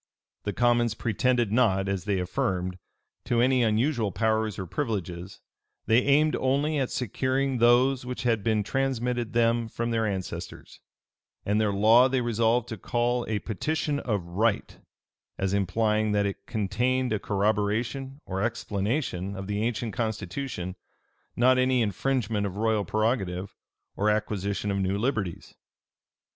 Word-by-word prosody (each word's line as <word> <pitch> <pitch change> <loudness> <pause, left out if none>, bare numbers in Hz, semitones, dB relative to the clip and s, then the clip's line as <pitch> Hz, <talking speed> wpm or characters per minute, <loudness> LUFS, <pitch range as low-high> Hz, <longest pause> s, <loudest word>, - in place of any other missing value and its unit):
The 105 - 0
commons 120 +1 +2
pretended 120 0 +1
not, 100 -5 +2
as 95 -3 -2
they 100 -2 +1
affirmed, 90 0 -2 0.5
to 120 - +1
any 130 +1 +3
unusual 115 0 +1
powers 110 +2 0
or 95 - -4
privileges: 95 - -4 0.4
they 115 +2 +5
aimed 145 +4 +3
only 140 +3 +1
at 130 - 0
securing 130 +2 -1
those 125 +3 +4
which 125 +1 -5
had 115 -4 +1
been 110 -2 +1
transmitted 125 -1 -1
them 115 0 +2
from 115 +1 -3
their 110 -1 +1
ancestors: 95 -3 -6 0.7
and 105 +2 +2
their 105 -2 +2
law 110 +6 +5
they 130 0 +1
resolved 115 0 +1
to 110 - -5
call 120 +4 -1
a 110 - 0
Petition 145 +8 -2
of 105 -9 -2
Right; 100 +6 -1 0.6
as 95 0 -1
implying 105 +2 +1
that 100 0 +2
it 100 - -5
contained 125 +3 0
a 105 - 0
corroboration 110 +7 -1
or 95 0 -3
explanation 100 - -2
of 95 0 -6
the 105 +1 -2
ancient 115 -1 -2
constitution, 110 -4 -3 0.6
not 130 +2 +4
any 130 -1 +3
infringement 110 0 -1
of 95 0 -7
royal 110 -1 +1
prerogative, 100 -4 -1 0.4
or 105 +2 +1
acquisition 105 -1 -1
of 100 - -1
new 95 +1 0
liberties. 105 -7 -2
110 Hz, 140 wpm, -27 LUFS, 100-125 Hz, 0.7 s, they